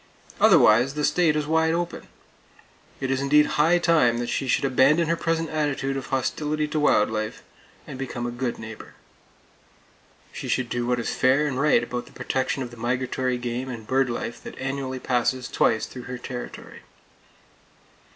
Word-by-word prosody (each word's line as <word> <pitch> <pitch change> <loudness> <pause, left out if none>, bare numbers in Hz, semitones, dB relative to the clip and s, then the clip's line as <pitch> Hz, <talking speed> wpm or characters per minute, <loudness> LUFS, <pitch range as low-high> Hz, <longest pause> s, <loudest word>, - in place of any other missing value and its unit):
Otherwise, 120 +6 +5
the 150 - -2
state 165 -4 +2
is 150 -1 0
wide 160 +1 +2
open! 175 0 -4 0.9
It 135 -1 -2
is 135 0 0
indeed 150 +2 +4
high 160 +5 +3
time 160 -9 +3
that 120 0 -3
she 135 - -2
should 130 - +1
abandon 135 +5 +3
her 170 - +3
present 165 -1 -1
attitude 145 -3 -1
of 135 - -5
hostility 150 +3 -1
to 155 - -1
wild 110 -8 +3
life, 110 0 -4 0.4
and 130 - -9
become 125 -2 -4
a 120 - -3
good 120 0 -3
neighbor. 110 0 -10 1.4
She - - -7
should 125 -2 -1
do 120 0 -2
what 125 0 +1
is 115 - -2
fair 135 +4 +3
and 135 -2 -1
right 140 -5 +4
about 120 0 -5
the - - -17
protection 130 +1 -2
of 120 - -8
the 120 - -12
migratory 125 +1 -1
game 120 +2 -4
and 115 -3 -7
bird 130 +2 +1
life 120 0 -4
that - - -10
annually 135 -1 -3
passes 125 0 0
twice 110 -1 +1
through 125 -1 -10
her 125 - -4
territory! 125 0 -8
130 Hz, 175 wpm, -24 LUFS, 120-150 Hz, 1.4 s, Otherwise